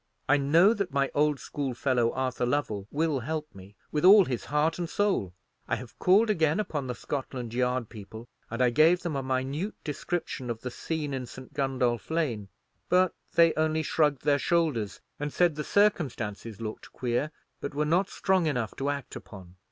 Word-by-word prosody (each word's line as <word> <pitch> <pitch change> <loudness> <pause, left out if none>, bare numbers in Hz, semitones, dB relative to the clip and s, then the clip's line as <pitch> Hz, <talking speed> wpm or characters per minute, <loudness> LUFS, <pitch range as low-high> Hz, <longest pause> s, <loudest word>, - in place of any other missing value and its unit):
I 145 - +5
know 165 +9 +5
that 200 -7 -3
my 140 0 +1
old 150 -1 +2
schoolfellow 130 -3 0
Arthur 130 -1 -1
Lovell 110 -8 -1
will 155 -2 0
help 155 +1 -4
me, 100 +1 -13 0.2
with 150 - -1
all 195 +1 +9
his 125 -6 -3
heart 155 +3 +1
and 170 -2 -2
soul. 195 - 0 0.4
I - - +1
have - - -10
called 200 +5 +5
again 165 -4 +2
upon 145 -10 -2
the 125 - -3
Scotland 130 -4 -5
Yard 125 -1 0
people, 110 +2 -10 0.2
and 115 +2 0
I 125 - +4
gave 165 +7 +4
them 170 -4 -2
a 135 - -1
minute 135 +9 -2
description 150 -4 -3
of 115 -1 -4
the 125 - -5
scene 150 +1 -3
in 130 -2 -4
St. 130 +1 -11
Gundolph 125 -6 0
Lane; 130 -12 -1 0.4
but 185 0 +4 0.2
they 165 -1 +6
only 155 0 +1
shrugged 150 -4 +1
their 145 -1 +3
shoulders, 145 - 0 0.2
and 145 0 -3
said 175 +1 +3
the 150 +1 -4
circumstances 120 - 0
looked 110 -1 -7
queer, 125 +4 -1 0.3
but 140 - -5
were 150 +1 +1
not 180 +5 +2
strong 190 -4 +1
enough 125 -7 -1
to 140 +1 -1
act 140 -2 -4
upon. 95 -4 -11
140 Hz, 185 wpm, -28 LUFS, 125-160 Hz, 0.4 s, all